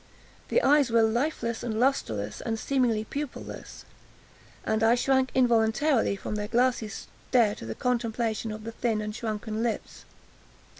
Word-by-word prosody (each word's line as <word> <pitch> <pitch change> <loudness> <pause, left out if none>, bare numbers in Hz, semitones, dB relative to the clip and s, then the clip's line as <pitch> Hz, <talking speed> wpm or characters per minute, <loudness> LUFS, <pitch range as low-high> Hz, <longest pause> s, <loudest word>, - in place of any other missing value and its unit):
The - - +2
eyes 285 -2 +5
were 230 -1 +4
lifeless, 235 0 0
and 220 -2 -2
lustreless, 110 - 0
and 225 -1 -2
seemingly 235 -3 +1
pupilless, 285 +3 -7 0.8
and 220 0 0
I 225 +2 +5
shrank 265 +1 +2
involuntarily 240 0 +3
from 200 - -5
their 210 0 -2
glassy 240 -1 +1
stare 215 +2 0
to 115 - -9
the 110 - -4
contemplation 230 -2 -1
of 215 0 -7
the 230 - -5
thin 225 -1 -1
and 210 0 -4
shrunken 220 -1 -3
lips. 235 -2 -3
230 Hz, 145 wpm, -27 LUFS, 215-250 Hz, 0.8 s, eyes